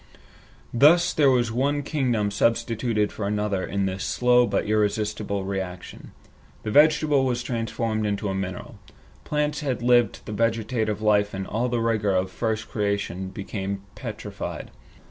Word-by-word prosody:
Thus 160 Hz, +8 st, +5 dB
there 145 Hz, -3 st, +4 dB
was 120 Hz, -3 st, +2 dB
one 140 Hz, +5 st, 0 dB
kingdom 125 Hz, -9 st, 0 dB
substituted 115 Hz, -1 st, +1 dB
for 100 Hz, -, -4 dB
another 105 Hz, -2 st, -1 dB
in 100 Hz, -1 st, -1 dB
this 95 Hz, 0 st, -3 dB
slow 125 Hz, 0 st, +3 dB
but -, -, 0 dB
irresistible 105 Hz, -1 st, 0 dB
reaction. 95 Hz, -2 st, -6 dB, 0.5 s
The 110 Hz, -, -3 dB
vegetable 150 Hz, 0 st, +4 dB
was 125 Hz, -2 st, -1 dB
transformed 115 Hz, -2 st, -2 dB
into 100 Hz, 0 st, -2 dB
a 95 Hz, -, -1 dB
mineral. 95 Hz, -1 st, -5 dB, 0.5 s
Plants 150 Hz, +1 st, -1 dB
which 150 Hz, -, -5 dB
had 125 Hz, -2 st, -1 dB
lived 120 Hz, -1 st, +3 dB
the -, -, -6 dB
vegetative 110 Hz, -1 st, -1 dB
life 105 Hz, -1 st, +2 dB
in 95 Hz, 0 st, -4 dB
all 120 Hz, +5 st, -1 dB
the 120 Hz, -1 st, 0 dB
vigor 110 Hz, -4 st, +1 dB
of 95 Hz, 0 st, 0 dB
first 110 Hz, 0 st, -2 dB
creation 100 Hz, -3 st, -2 dB
became 100 Hz, 0 st, -5 dB
petrified. -, -, -6 dB
110 Hz, 145 wpm, -25 LUFS, 100-125 Hz, 0.5 s, Thus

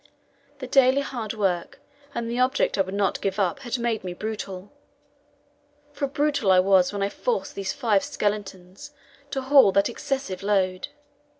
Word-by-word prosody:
The 265 Hz, -, -6 dB
daily 260 Hz, +1 st, +4 dB
hard 230 Hz, -6 st, -5 dB
work 185 Hz, -5 st, -1 dB, 0.4 s
and 235 Hz, -1 st, -2 dB
the 235 Hz, +2 st, -3 dB
object 260 Hz, +2 st, +2 dB
I 195 Hz, -, +2 dB
would 190 Hz, +1 st, -3 dB
not 200 Hz, -2 st, 0 dB
give 195 Hz, 0 st, -2 dB
up 190 Hz, +2 st, 0 dB
had 255 Hz, -2 st, -3 dB
made 235 Hz, -3 st, -1 dB
me 180 Hz, -1 st, -5 dB
brutal, 200 Hz, -2 st, -6 dB, 1.2 s
for 280 Hz, -, -2 dB
brutal 285 Hz, -7 st, +1 dB
I 185 Hz, -, +6 dB
was 185 Hz, -1 st, +4 dB
when 200 Hz, -1 st, -2 dB
I 200 Hz, -, 0 dB
forced 480 Hz, -, -2 dB
those 195 Hz, -1 st, -3 dB
five 215 Hz, -7 st, +1 dB
skeletons 205 Hz, +5 st, -4 dB, 0.4 s
to 270 Hz, -, -3 dB
haul 270 Hz, -6 st, +6 dB
that 200 Hz, +3 st, +3 dB
excessive 250 Hz, -5 st, -4 dB
load. 190 Hz, -2 st, 0 dB
210 Hz, 165 wpm, -25 LUFS, 190-260 Hz, 1.2 s, I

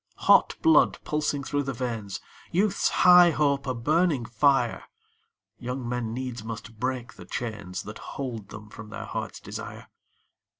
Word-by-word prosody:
Hot -, -, +6 dB
blood 325 Hz, -1 st, +5 dB
pulsing 150 Hz, -2 st, -1 dB
through 145 Hz, +1 st, -1 dB
the 135 Hz, -1 st, -3 dB
veins, 115 Hz, -5 st, -4 dB, 0.3 s
Youth's 195 Hz, +2 st, +2 dB, 0.2 s
high 180 Hz, -1 st, +9 dB
hope 140 Hz, -3 st, +1 dB
a 130 Hz, -, -1 dB
burning 150 Hz, +1 st, +1 dB
fire, 125 Hz, 0 st, +2 dB, 0.7 s
Young 125 Hz, 0 st, -4 dB
men 120 Hz, -2 st, -2 dB
needs 125 Hz, -1 st, -5 dB
must 115 Hz, 0 st, -8 dB
break 125 Hz, -1 st, -3 dB
the -, -, -12 dB
chains 100 Hz, -6 st, -5 dB
That 105 Hz, +1 st, -9 dB, 0.2 s
hold 120 Hz, -7 st, -5 dB
them 110 Hz, 0 st, -10 dB
from 110 Hz, -1 st, -10 dB
their -, -, -6 dB
hearts' -, -, -5 dB
desire. -, -, -8 dB
125 Hz, 145 wpm, -26 LUFS, 115-145 Hz, 0.7 s, high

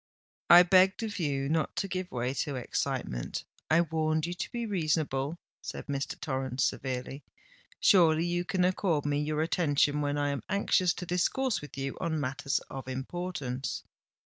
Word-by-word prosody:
"I 175 Hz, +1 st, +10 dB
begged 185 Hz, +4 st, +4 dB
of 210 Hz, -3 st, -4 dB
you 140 Hz, -4 st, 0 dB
not 160 Hz, +1 st, 0 dB
to 195 Hz, -, -1 dB
give 185 Hz, -1 st, -4 dB
way 125 Hz, +1 st, -1 dB
to 140 Hz, 0 st, -2 dB
excitement—I 125 Hz, -, -2 dB
warned 155 Hz, -1 st, 0 dB
you 175 Hz, -, -3 dB
to 180 Hz, -, -5 dB
be 235 Hz, -1 st, -3 dB
reasonable," 155 Hz, -6 st, 0 dB, 0.2 s
said -, -, -6 dB
Mr. 140 Hz, -1 st, -3 dB
Torrens 130 Hz, -3 st, -2 dB
severely. 130 Hz, +2 st, -2 dB, 0.6 s
"Surely 165 Hz, -4 st, +5 dB
you 175 Hz, 0 st, 0 dB
can 185 Hz, -1 st, +1 dB
accord 180 Hz, -5 st, +1 dB
me 145 Hz, 0 st, +1 dB
your 150 Hz, +1 st, 0 dB
attention 150 Hz, -3 st, +2 dB
when 145 Hz, 0 st, 0 dB
I 145 Hz, 0 st, +1 dB
am 140 Hz, -3 st, -2 dB
anxious 185 Hz, -2 st, +2 dB
to 180 Hz, -, -6 dB
discourse 210 Hz, +8 st, 0 dB
with 145 Hz, -2 st, -10 dB
you 135 Hz, 0 st, -4 dB
on 160 Hz, -2 st, -1 dB
matters 140 Hz, 0 st, -1 dB
of 135 Hz, -1 st, -7 dB
importance?" 135 Hz, -1 st, -4 dB
155 Hz, 160 wpm, -30 LUFS, 135-180 Hz, 0.6 s, I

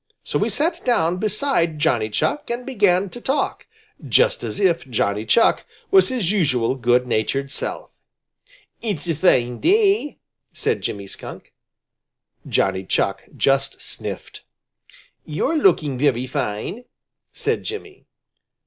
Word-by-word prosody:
So -, -, -2 dB
he -, -, +1 dB
sat 335 Hz, +3 st, 0 dB
down 175 Hz, -8 st, +2 dB
beside 210 Hz, -, 0 dB
Johnny 125 Hz, -9 st, +1 dB
Chuck 110 Hz, -, -1 dB
and 240 Hz, +1 st, -3 dB
began 200 Hz, -7 st, +2 dB
to 245 Hz, -, -9 dB
talk, 275 Hz, +4 st, -1 dB, 0.4 s
just -, -, +2 dB
as -, -, -4 dB
if 170 Hz, -8 st, +1 dB
Johnny 105 Hz, -2 st, -1 dB
Chuck 230 Hz, -, +4 dB, 0.3 s
was 385 Hz, -4 st, +6 dB
his 235 Hz, -9 st, 0 dB
usual 135 Hz, -, +1 dB
good 125 Hz, -1 st, +2 dB
natured 135 Hz, +4 st, -1 dB
self. -, -, -4 dB, 0.9 s
"It's 200 Hz, -8 st, -2 dB
a 165 Hz, -, +1 dB
fine 125 Hz, -7 st, +2 dB
day," 400 Hz, -5 st, +2 dB, 0.4 s
said -, -, -1 dB
Jimmy 100 Hz, -1 st, -4 dB
Skunk. 95 Hz, -, -10 dB, 1.0 s
Johnny 95 Hz, -1 st, +1 dB
Chuck 100 Hz, +1 st, -1 dB
just 135 Hz, 0 st, +1 dB
sniffed. -, -, -7 dB, 0.8 s
"You're 270 Hz, -, -1 dB
looking 150 Hz, -, +2 dB
very 130 Hz, -3 st, +2 dB
fine," 130 Hz, -, -4 dB, 0.5 s
said -, -, -1 dB
Jimmy. 410 Hz, -2 st, -8 dB
165 Hz, 125 wpm, -21 LUFS, -, 1.0 s, was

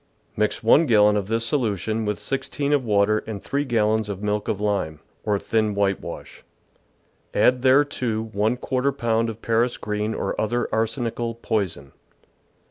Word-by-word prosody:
Mix 105 Hz, +1 st, 0 dB
1 145 Hz, +8 st, +5 dB
gallon 105 Hz, -3 st, +5 dB
of 100 Hz, -2 st, -1 dB
this 115 Hz, +1 st, 0 dB
solu 115 Hz, -7 st, 0 dB
tion 110 Hz, +3 st, -2 dB
with 105 Hz, -1 st, -1 dB
16 135 Hz, +5 st, -2 dB
of 140 Hz, -3 st, +2 dB
water 105 Hz, -1 st, +2 dB
and 110 Hz, -3 st, -4 dB
three 140 Hz, +7 st, -2 dB
gallons 110 Hz, -4 st, +1 dB
of 100 Hz, 0 st, -5 dB
milk 105 Hz, 0 st, -1 dB
of 100 Hz, -, -1 dB
lime, 100 Hz, -7 st, -1 dB, 0.2 s
or 105 Hz, -1 st, +1 dB
thin 110 Hz, 0 st, 0 dB
whitewash; 100 Hz, -1 st, -3 dB, 0.9 s
add 125 Hz, 0 st, +4 dB
thereto 130 Hz, -4 st, +2 dB
14 125 Hz, +6 st, 0 dB
pound 115 Hz, -3 st, 0 dB
of 110 Hz, 0 st, -8 dB
Paris 115 Hz, +2 st, +1 dB
green 105 Hz, +1 st, -2 dB
or -, -, -2 dB
other 120 Hz, +3 st, 0 dB
arsenical 115 Hz, +1 st, -1 dB
poison. 100 Hz, -, -2 dB
110 Hz, 150 wpm, -23 LUFS, 105-120 Hz, 0.9 s, 1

